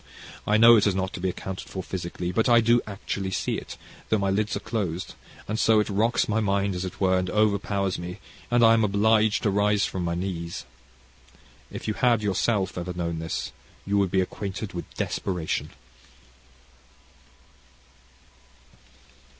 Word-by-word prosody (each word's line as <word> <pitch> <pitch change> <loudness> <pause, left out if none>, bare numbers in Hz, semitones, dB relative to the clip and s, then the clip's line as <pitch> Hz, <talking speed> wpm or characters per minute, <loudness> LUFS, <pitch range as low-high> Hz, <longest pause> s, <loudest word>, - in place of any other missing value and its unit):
I 105 - +4
know 115 +1 +8
it 105 - +3
is 100 - +1
not 95 0 -2
to - - -6
be 95 +1 0
accounted 95 +1 -6
for 95 - -5
physically, 90 -1 -4
but 110 +7 +1
I 120 -1 +7
do 115 +1 +4
actually 100 -1 -4
see 95 - -1
it, - - -8 0.3
though 110 - +3
my 100 -1 0
lids 105 +2 0
are - - -4
dosed, 95 -6 -3 0.3
and 110 +1 -2
so 110 -1 +4
it 105 - 0
rocks 110 +4 +2
my 110 +1 +1
mind, 100 -1 +1
as 90 0 -3
it 90 - -7
were, 95 -1 +3
and 90 0 -2
overpowers 100 -3 +1
me, 90 +1 -6 0.3
and 120 -1 +4
I 115 - +7
am 115 -1 +3
obliged 105 +1 +3
to 105 - +2
rise 105 0 +2
from 95 - -3
my 85 0 -1
knees. 85 -2 -4 1.1
If - - -7
you 110 - 0
had 125 +2 +3
ever 110 -2 -1
yourself 100 0 0 0.2
known 85 -2 -2
this, 80 0 -4 0.3
you 100 +1 +1
would 100 -2 +2
be 95 +1 +2
acquainted 100 +2 -5
with 85 - -6
desperation." 90 -4 -2
100 Hz, 170 wpm, -26 LUFS, 95-110 Hz, 1.1 s, know